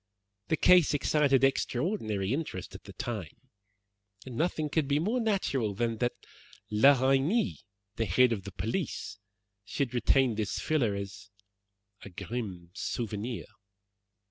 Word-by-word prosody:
The 160 - +1
case 175 -3 +5
excited 140 -2 +3
extraordinary 125 - 0
interest 135 - -4
at - - -11
the - - -10
time, 105 -9 -5 0.9
and 130 -3 -8
nothing 155 +2 0
could 150 -1 0
be 140 +1 +2
more 210 +11 0
natural 140 - 0
than 115 +1 -1
that 120 0 0 0.6
La 130 +6 +6
Reynie, 150 - +2 0.4
the 115 - +1
head 120 +7 +4
of 100 -4 -4
the 100 - -7
police, 110 - -3 0.4
should 125 +4 -2
retain 125 +1 +3
this 105 -1 -2
filler 125 -10 +1
as 100 +2 -7 0.7
a - - -9
grim 95 -2 -6
souvenir. 110 +2 -4
120 Hz, 130 wpm, -30 LUFS, 105-145 Hz, 0.9 s, La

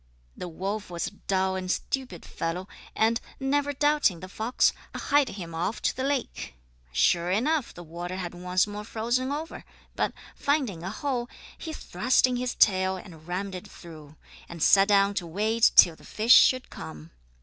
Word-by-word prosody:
The 180 - -6
wolf 195 +5 -4
was 170 -1 -3
a - - -5
dull 190 -1 -1
and 185 -1 -4
stupid 250 -2 -3
fellow 175 +3 -4 0.3
and, 225 +1 +2 0.2
never 285 +2 0
doubting 290 - +2
the 185 - -8
fox, 220 +6 +1 0.2
hied 285 -2 +2
him 175 -4 -7
off 170 +7 -2
to - - +1
the 260 - -3
lake. 270 - -3 0.4
Sure 170 - +2
enough 255 +8 +1
the 175 - -11
water 175 +2 -6
had 180 -2 -5
once 180 +1 +1
more 210 0 -7
frozen 240 +5 -1
over, 310 +3 -5 0.3
but, - - 0 0.2
finding 270 - 0
a 185 - -4
hole, 245 +2 -3 0.3
he 320 - -7
thrust 250 - +1
in 250 -1 -1
his 250 0 -2
tail 190 -2 +3
and 165 -4 -13
rammed 190 +2 -3
it 180 - -7
through, 155 -3 -13 0.3
and 170 -2 -4
sat 195 0 +6
down 200 -1 +4
to 180 -4 -3
wait 215 +6 +2
till 170 - +8
the - - -19
fish 225 +3 +3
should 255 -1 +5
come. 80 0 -9
195 Hz, 175 wpm, -27 LUFS, 175-250 Hz, 0.4 s, till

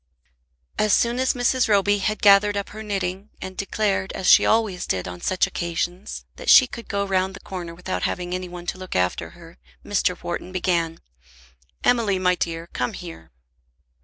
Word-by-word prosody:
As 215 -1 +3
soon 240 +1 +2
as 260 0 +1
Mrs. 245 +1 +2
Roby 205 0 +3
had 215 +2 -2
gathered 205 0 +6
up 200 - -3
her 215 - -9
knitting, 195 -1 -3
and 185 0 -7
declared, 195 -1 -1
as 190 - -5
she - - +7
always 215 -5 +1
did 90 -1 -1
on 90 -1 -8
such 185 - +2
occasions, 175 +2 -4
that - - -4
she 260 - +9
could 235 -2 -9
go 200 -1 -1
round 190 0 0
the - - -10
corner 175 -3 -7
without 180 +2 -4
having 180 0 -2
any 185 0 -4
one 175 0 -9
to 185 - -4
look 185 -1 -7
after 90 0 0
her, 170 0 -15 0.3
Mr. 190 -3 0
Wharton 175 +1 -4
began. 170 -3 -1 0.8
"Emily, 225 -6 +3
my 180 0 +2
dear, 165 -2 -3
come 125 - -2
here." 80 0 -9
185 Hz, 180 wpm, -23 LUFS, 175-205 Hz, 0.8 s, she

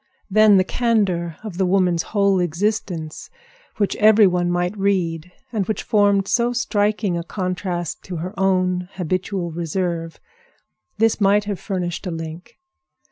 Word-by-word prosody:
Then 215 0 +6
the 185 - +4
candor 190 -7 0
of 200 -5 -7
the 190 - +3
woman's 180 -3 +2
whole 200 -1 +1
existence, 175 -2 -2 0.5
which 205 -3 0
every 215 0 +6
one 180 -1 +1
might 175 +2 -1
read, 180 -4 -1 0.2
and 200 -4 -1
which 220 - -2
formed 205 -3 +2
so 240 +2 +1
striking 210 -4 0
a - - -5
contrast 180 -2 -3
to 185 - -6
her 175 +4 -5
own 185 -2 +1
habitual 185 0 -2
reserve—this 170 - -4
might 205 +1 +4
have 205 -2 -4
furnished 180 -2 -4
a - - -3
link. 165 +1 -7
185 Hz, 135 wpm, -21 LUFS, 175-205 Hz, 0.5 s, Then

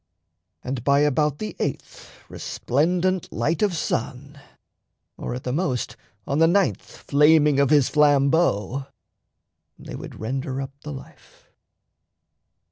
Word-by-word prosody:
And 125 -2 -4
by 140 +1 +3
about 150 0 +1
the 105 -4 -6
eighth - - -5 0.2
Resplendent 180 +7 -1
light 145 +9 -1
of 200 -5 +1
sun, 140 +1 -4 0.8
or - - -5
at 125 - -7
the 125 - -3
most 145 -6 -2 0.3
On 140 - -1
the 165 - +6
ninth 195 +2 +2
flaming 150 0 +3
of 140 -2 +3
his 145 -4 +4
flambeau, 140 - +2 0.9
they - - -10
Would - - -9
render 130 +3 -3
up 135 -1 -5
the 150 - -7
life. 135 - -13
145 Hz, 125 wpm, -23 LUFS, 130-155 Hz, 0.9 s, the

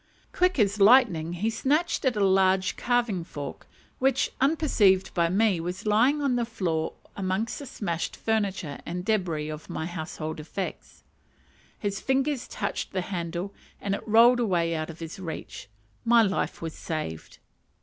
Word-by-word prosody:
Quick 365 -1 +2
as 210 -2 +2
lightning, 195 -7 +5
he 210 +6 -1
snatched 295 +9 0
at 255 -3 +2
a 205 -1 +2
large 190 0 +3
carving 235 -7 0
fork, 145 -3 -8 0.3
which, 265 +1 +2
unperceived 235 - +3
by 170 -2 +2
me, 200 -1 +2
was 180 +4 -5
lying 245 +8 +3
on 270 -3 +2
the 240 - +1
floor 180 -9 -2 0.2
amongst 195 +3 -2
the 285 - -8
smashed 170 -8 -3
furniture 200 -9 -1
and 180 +2 -5
débris 170 -8 0
of 155 - -10
my 160 - -3
household 160 -2 -5
effects; 175 +5 -6 0.7
his 200 -1 -3
fingers 265 0 0
touched - - -4
the 185 - 0
handle 175 +1 -4 0.3
and 200 - -2
it - - -5
rolled 235 +3 +6
away 175 -7 +1
out 155 0 -3
of 165 - -8
his 165 +4 -8
reach: 165 - -7 0.3
my 230 0 +5
life 195 -4 -1
was 165 -1 -4
saved. 115 - -5
195 Hz, 155 wpm, -27 LUFS, 170-230 Hz, 0.7 s, rolled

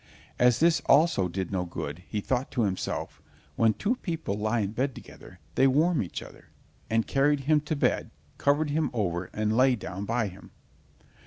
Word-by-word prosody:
As 125 -1 +4
this 165 0 +4
also 140 - +4
did 95 +1 -4
no 95 -2 0
good, 85 -2 -6
he 105 - -3
thought 130 +4 -1
to 120 - +1
himself: 95 -3 -3 0.3
"When 110 -1 +3
two 235 +5 0
people 165 - -3
lie 110 +2 0
in 100 -1 -2
bed 130 +3 -1
together, - - -13 0.2
they 135 - +4
warm 155 +5 +3
each 90 - -5
other," - - -15 0.4
and 115 0 +2
carried 145 +1 +2
him 150 +2 +3
to 150 +1 -3
bed, 140 - 0 0.3
covered 145 +1 +2
him 155 +1 +1
over 95 -6 -1
and 110 0 -1
lay 130 +1 +4
down 100 -3 -6
by 115 0 0
him. 95 0 -12
120 Hz, 180 wpm, -27 LUFS, 100-145 Hz, 0.4 s, As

